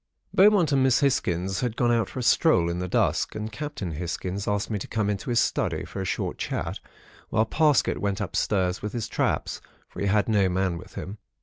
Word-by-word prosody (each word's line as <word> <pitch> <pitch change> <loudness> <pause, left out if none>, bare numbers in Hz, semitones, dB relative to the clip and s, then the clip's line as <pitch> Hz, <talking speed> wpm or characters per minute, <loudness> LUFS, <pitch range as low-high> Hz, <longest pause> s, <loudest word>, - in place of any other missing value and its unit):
"Beaumont 195 -5 +5
and 135 -1 +3
Miss 130 +1 +3
Hisgins 95 -9 0
had 120 -3 -2
gone 120 -1 +3
out 115 -4 +1
for - - -10
a 125 - -2
stroll 115 - +4
in 85 - -3
the 90 - -2
dusk, 90 - +1
and 110 +1 -4
Captain 130 - -5
Hisgins 90 +4 -4
asked 105 +1 -1
me 105 - -1
to - - -6
come 105 -2 0
into 100 +4 -4
his 120 - +3
study - - 0
for 95 - -6
a - - -3
short - - -3
chat - - -3 0.5
whilst 110 0 +1
Parsket 150 -4 +3
went 100 0 -1
upstairs 95 -2 0
with 105 0 -4
his 115 -3 -3
traps, - - -1 0.3
for - - -11
he 100 - 0
had 105 +1 +2
no 100 -4 +3
man 90 -1 0
with 90 - -14
him. 100 +3 -6
105 Hz, 215 wpm, -26 LUFS, 95-120 Hz, 0.5 s, Beaumont